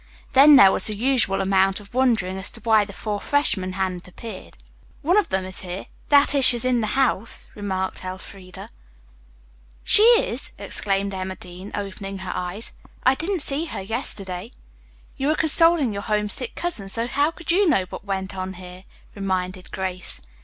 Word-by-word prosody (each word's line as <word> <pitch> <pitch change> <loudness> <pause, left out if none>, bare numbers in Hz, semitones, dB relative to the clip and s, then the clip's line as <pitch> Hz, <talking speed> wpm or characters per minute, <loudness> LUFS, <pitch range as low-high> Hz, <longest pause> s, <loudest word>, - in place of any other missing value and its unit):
Then 285 +2 +8
there 195 -7 +8
was - - +4
the 215 - -2
usual 220 -4 +1
amount 195 0 +2
of 205 +1 -17
wondering 230 -8 +1
as 190 0 -2
to - - -8
why 220 -3 +3
the 200 - -11
four 205 0 -4
freshmen 200 -8 0
hadn't 185 -2 -3
appeared. 190 +2 -10 0.5
"One 345 +6 +2
of 420 - +2
them 190 0 -1
is 185 0 -7
here 180 +1 -7 0.2
that 285 0 +4
is, 280 -2 +2
she's 245 -2 +8
in 250 -2 +1
the 215 +4 -2
house," 240 -5 -1
remarked 190 -3 -4
Elfreda 185 0 -9
laconically. - - -13 1.1
"She - - +6
is!" 465 +1 +3
exclaimed 200 0 -2
Emma 190 0 -5
Dean, 180 +3 -11
opening 195 -1 -6
her 190 -1 -6
eyes. 180 +5 -3 0.3
"I 260 - +4
didn't 335 +3 -1
see 290 +4 -1
her 310 - -6
yesterday." 195 -3 -5 0.7
"You 275 0 -2
were 310 - +2
consoling 320 -5 +4
your 200 - -4
homesick 210 +3 -1
cousin, 275 - -2
so 230 +4 +1
how 285 +5 +1
could 340 +1 -4
you 380 +1 +3
know 195 - +2
what - - -8
went 195 -1 -4
on 185 0 -5
here?" 180 +1 -12 0.3
reminded 185 -2 -4
Grace. 185 -1 0
200 Hz, 175 wpm, -22 LUFS, 190-265 Hz, 1.1 s, Then